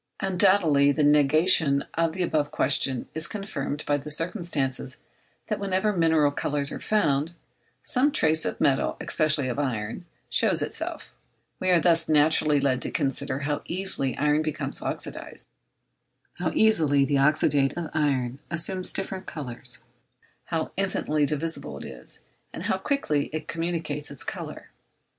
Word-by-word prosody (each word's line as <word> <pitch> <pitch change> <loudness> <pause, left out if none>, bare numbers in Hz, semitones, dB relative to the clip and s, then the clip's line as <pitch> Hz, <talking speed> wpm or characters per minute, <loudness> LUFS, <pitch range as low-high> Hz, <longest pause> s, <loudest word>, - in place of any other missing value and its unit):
Undoubtedly 180 -7 +4
the 150 +2 0
negation 145 0 +4
of 165 -1 0
the 185 +1 -1
above 150 -4 0
question 135 -2 +1
is 160 +1 0
confirmed 170 -9 -4
by 145 - +2
the 145 +2 -8
circumstance 150 - -1 0.5
that - - -3
wherever 200 +1 0
mineral 160 -4 +3
colours 145 0 -2
are - - -5
found, 160 -7 +1 0.5
some 275 +3 +1
trace 160 - +2
of - - -3
metal, 135 -1 +2
especially 155 -4 +1
of 125 +2 -3
iron, 120 +2 -3 0.2
shows - - +2
itself; - - -5 0.5
we 185 - 0
are 180 -2 +5
thus 165 -1 +2
naturally 150 -1 +4
led 135 -2 +1
to - - -1
consider 135 0 -2
how 145 +1 -2
easily 180 -7 +1
iron 150 +1 +2
becomes 155 -1 -2
oxydised, - - -5 0.9
how 175 -2 0
easily 155 -11 +4
the 140 0 +1
oxyde 140 -1 +2
of 170 -2 -4
iron 135 -4 0
assumes 180 +2 0
different 190 -1 -4
colours, 125 -4 -8 0.6
how 160 +1 -2
infinitely 155 -6 0
divisible 160 +2 -3
it - - -8
is, - - -6 0.3
and - - -7
how - - 0
quickly 155 - 0
it 155 0 -5
communicates 165 -3 -3
its 140 -2 -4
colour. - - -7
150 Hz, 145 wpm, -26 LUFS, 140-170 Hz, 0.9 s, are